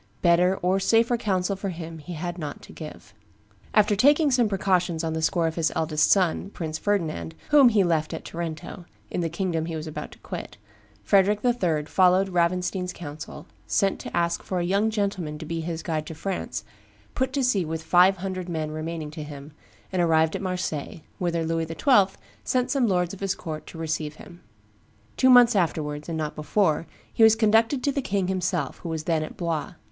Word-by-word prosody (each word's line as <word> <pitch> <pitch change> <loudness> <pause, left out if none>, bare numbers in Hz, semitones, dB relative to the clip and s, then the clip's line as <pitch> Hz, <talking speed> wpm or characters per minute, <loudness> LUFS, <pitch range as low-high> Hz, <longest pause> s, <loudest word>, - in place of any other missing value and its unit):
Better 180 +2 +4
or 185 +2 +2
safer 230 +4 +3
counsel 195 -4 0
for 195 +1 -4
him 165 -2 -7
he 175 +4 -8
had 175 +2 -5
not 150 -3 -6
to - - -13
give." - - -10 0.6
After 210 0 +4
taking 290 - +4
some 245 -4 +3
precautions 185 -4 +1
on 160 -1 -1
the 160 - -2
score 170 +1 +1
of 160 - 0
his 165 -1 +1
eldest 155 -1 +2
son, 190 0 +2
Prince 160 -5 -5
Ferdinand, 155 - -1 0.2
whom 285 -4 +8
he 210 -4 +3
left 160 -3 0
at 160 - -6
Tarento, 170 +2 -6 0.3
in - - -1
the 165 - -1
kingdom 170 -2 -2
he 165 - -4
was 155 0 -5
about 155 - -6
to - - -16
quit, - - -7 0.5
Frederick 200 +1 +3
III. 175 -11 +1
followed 185 +3 +3
Ravenstein's 180 +1 0
counsel, 155 -2 -8 0.2
sent 195 -2 +1
to - - -5
ask 170 0 +1
for 185 - -4
"a 175 - 0
young 200 +5 +2
gentleman 200 -8 -2
to 155 - -8
be 165 +1 -3
his 165 0 -4
guide 155 -2 -2
to 160 - -7
France," 190 +4 -4 0.5
put 260 0 -1
to 275 -1 0
sea 220 -7 +2
with 160 0 -4
five 185 +3 +5
hundred 185 -1 -4
men 155 -2 -3
remaining 155 0 -5
to 155 - -7
him, 145 0 -9 0.4
and 185 - +2
arrived 160 -1 +3
at - - -3
Marseilles, 180 -5 -3 0.2
whither 170 -2 0
Louis 165 0 -1
XII. 195 - +3 0.3
sent 250 0 0
some 260 -4 +2
lords 180 -2 +1
of 195 - -9
his 195 -1 -1
court 155 -2 -7
to - - -10
receive 155 -2 -3
him. 175 +2 -14 0.7
Two 260 - +4
months 245 -3 +7
afterwards, 150 -4 -1
and 165 - -2
not 155 -1 -3
before, 160 0 +1 0.3
he - - -1
was 220 0 +8
conducted 225 +4 +3
to 285 - +2
the 280 - -1
king 195 -6 -1
himself, 185 -1 -1
who 170 - -6
was 160 -1 -3
then 160 -1 +1
at 155 - -6
Blois. 170 +1 -2
175 Hz, 200 wpm, -25 LUFS, 160-195 Hz, 0.7 s, whom